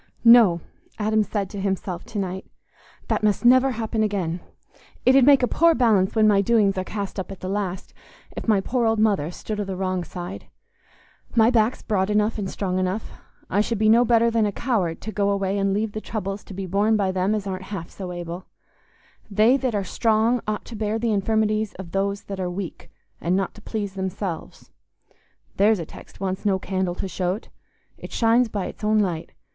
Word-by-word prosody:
"No!" 225 -8 +7 0.4
Adam 215 0 +2
said 205 -1 -2
to 200 - -5
himself 190 -2 -2
to 220 - -7
night, 190 -1 -3 0.6
"that - - 0
must 210 +2 +1
never 255 +2 +6
happen 220 -1 -2
again. 190 -5 -1 0.7
It 255 - +6
'ud 270 - +7
make 275 -3 +6
a - - +4
poor 335 +4 +4
balance 215 -7 +3
when 215 -1 +5
my 200 -2 +5
doings 205 -2 +3
are - - -1
cast 200 0 -5
up 190 - -5
at 195 - -9
the 185 - -4
last, 190 -2 -3 0.4
if - - -6
my 210 -3 +4
poor 240 +3 0
old 225 0 +2
mother 205 -8 +2
stood 210 +4 -5
o' - - 0
the 195 -1 -5
wrong 185 -1 -1
side. 180 +2 -7 0.9
My 225 0 +5
back's 230 0 +1
broad 195 -3 0
enough 210 +1 +1
and 195 -2 -3
strong 185 -2 -2
enough; 185 +3 -2 0.4
I 200 - +2
should 230 +1 -1
be 215 +1 +3
no 230 +2 +6
better 235 -1 +3
than 225 -2 +2
a - - -1
coward 200 -8 -1
to 220 - -5
go 200 -1 0
away 200 0 0
and 195 0 +1
leave 210 +2 0
the 215 - -5
troubles 200 -2 -4
to - - -10
be 195 0 -4
borne 205 +4 +2
by 195 -2 +1
them 190 +3 +1
as 205 -2 -3
aren't 190 -1 -4
half 190 -5 -6
so 185 -2 -7
able. 175 +1 -6 0.8
'They 215 +5 +4
that 255 -5 -1
are 200 - 0
strong 225 +4 +1
ought 215 -1 -2
to 235 - -9
bear 215 0 -1
the 225 -1 0
infirmities 215 +1 0
of 185 -3 -9
those 200 +1 -1
that 195 -1 -6
are 180 -1 -1
weak, 180 -1 -6 0.3
and 175 +3 +1
not 195 -1 -1
to 215 - -15
please 205 -3 -4
themselves.' 190 -3 -5 0.9
There's 210 +2 +4
a 170 - -5
text - - -14
wants 190 0 -3
no 200 -3 +2
candle 185 -2 -2
to 195 - -4
show't; 185 +3 -3 0.5
it - - -9
shines 230 +1 +3
by 205 -3 -3
its - - -9
own 215 +1 +3
light. 180 -6 -1
205 Hz, 205 wpm, -23 LUFS, 190-220 Hz, 0.9 s, No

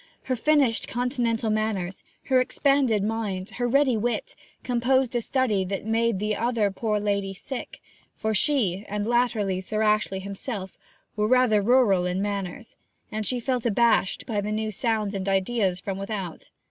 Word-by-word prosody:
Her 255 - -1
finished 275 -2 +2
Continental 240 -2 -1
manners, 210 -4 -2 0.2
her 260 -2 +3
expanded 260 -5 +2
mind, 210 -2 -2
her 245 +2 -2
ready 265 0 +3
wit, 235 +3 -2 0.3
composed 250 +1 +1
a 240 - +2
study 230 -6 +1
that 195 +2 -4
made 225 -1 +1
the 210 +2 -1
other 230 -3 +1
poor 210 +1 -1
lady 200 -1 -1
sick; 260 +7 -7 0.4
for 220 0 -1
she, 210 - +2
and 205 0 -2
latterly 225 -5 +1
Sir 215 +3 -2
Ashley 210 -2 +1
himself, 200 0 -5 0.4
were 210 0 +1
rather 250 -3 +4
rural 205 -5 +4
in 180 +1 -1
manners, 200 +2 -4 0.4
and 215 0 -2
she 250 - 0
felt 250 0 -1
abashed 235 -3 +2
by 210 -3 -1
new 215 +1 -2
sounds 215 -1 -1
and 195 0 -2
ideas 195 -1 +1
from 195 0 -4
without. 195 -4 -5
215 Hz, 155 wpm, -25 LUFS, 200-240 Hz, 0.4 s, rather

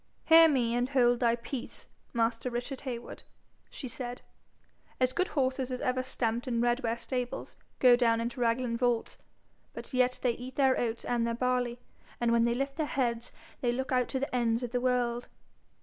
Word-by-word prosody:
'Hear 325 0 +8
me, 245 -5 +1
and 245 +1 0
hold 245 -3 +3
thy 235 -2 +3
peace, 240 +2 -7 0.2
master 230 +1 0
Richard 245 +2 -4
Heywood,' 245 -4 -6 0.5
she 260 - -6
said. 250 -1 -6 0.8
'As 255 0 +2
good 365 +5 +1
horses 265 -7 -1
as 250 - -3
ever 255 0 0
stamped 240 -2 -2
in 235 -2 0
Redware 240 -1 +1
stables 250 0 -4 0.2
go 250 -2 +7
down 230 -2 +2
into 240 +2 -3
Raglan 235 0 +1
vaults; 240 -2 0 0.5
but - - -8
yet 255 0 +2
they 250 - +3
eat 250 +2 -8
their 265 -2 +4
oats 235 -1 -2
and 235 -1 0
their 230 - -1
barley, 250 -1 0 0.4
and 235 -1 +2
when 235 0 +4
they 235 0 +2
lift 275 +2 -3
their 310 -2 0
heads 240 -4 -1 0.3
they 240 - +1
look 260 +3 -3
out 250 -1 +2
to 265 - -2
the 270 -1 -3
ends 235 0 +1
of 240 - -4
the 245 0 0
world. 245 -1 0
245 Hz, 185 wpm, -30 LUFS, 235-260 Hz, 0.8 s, Hear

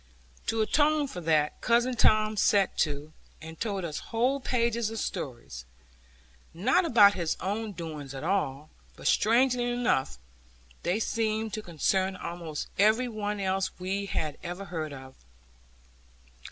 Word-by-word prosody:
To 225 -1 +2
atone 295 +4 +2
for 180 -9 -7
that, 155 -2 +1
cousin 240 +2 +2
Tom 215 -1 +3
set 200 -1 +3
to, 150 0 -1 0.3
and 160 0 -10
told 200 -5 -2
us 155 -3 -4
whole 250 +5 +1
pages 235 -3 0
of 225 - -6
stories, 120 - -5 0.9
not 260 - +3
about 210 -9 +7
his 170 -4 -2
own 210 +3 -3
doings 155 -6 -7
at 135 - -6
all, 155 -6 -1 0.2
but - - -13
strangely 245 +2 +3
enough 240 - 0 0.6
they 180 +5 0
seemed 220 -1 -1
to 215 - -3
concern 190 +2 0
almost 170 -4 -5
every 220 +5 +4
one 210 -2 -3
else 190 -1 0
we 195 +2 -2
had 155 -6 -3
ever 180 +3 -5
heard 160 -4 -4
of. 130 -1 -10
200 Hz, 140 wpm, -28 LUFS, 160-225 Hz, 0.9 s, about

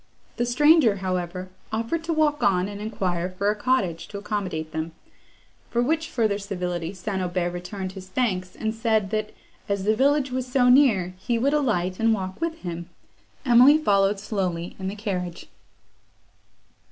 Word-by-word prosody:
The 240 0 0
stranger, 295 -2 +5
however, 185 -1 -3 0.2
offered 230 +9 -2
to 335 - -1
walk 305 -2 +2
on, 185 -1 +2
and 205 0 -7
enquire 185 -5 -2
for 200 +3 0
a - - -3
cottage 205 -8 0
to 205 - -7
accommodate 195 -7 -3
them; 160 +1 -4 0.8
for 235 - -1
which 320 +4 0
further 215 -4 0
civility 180 -4 -3
St. 190 0 -4
Aubert 175 -1 -1
returned 185 +2 -5
his 190 -1 -10
thanks, 185 -5 -1
and 220 0 -2
said, 220 -3 0
that, 215 -1 -1 0.4
as 200 -1 0
the 215 +2 +2
village 275 +1 +2
was 255 0 -3
so 250 -1 +4
near, 225 -10 +4
he 235 +4 -1
would 275 +5 +1
alight, 190 -11 0
and 225 0 +3
walk 190 - -6
with 330 0 -2
him. 170 -1 -6 0.6
Emily 250 +4 +7
followed 200 -8 +2
slowly 185 -5 -3
in 190 - -4
the 195 - -3
carriage. 185 -5 -4
205 Hz, 165 wpm, -25 LUFS, 185-245 Hz, 0.8 s, Emily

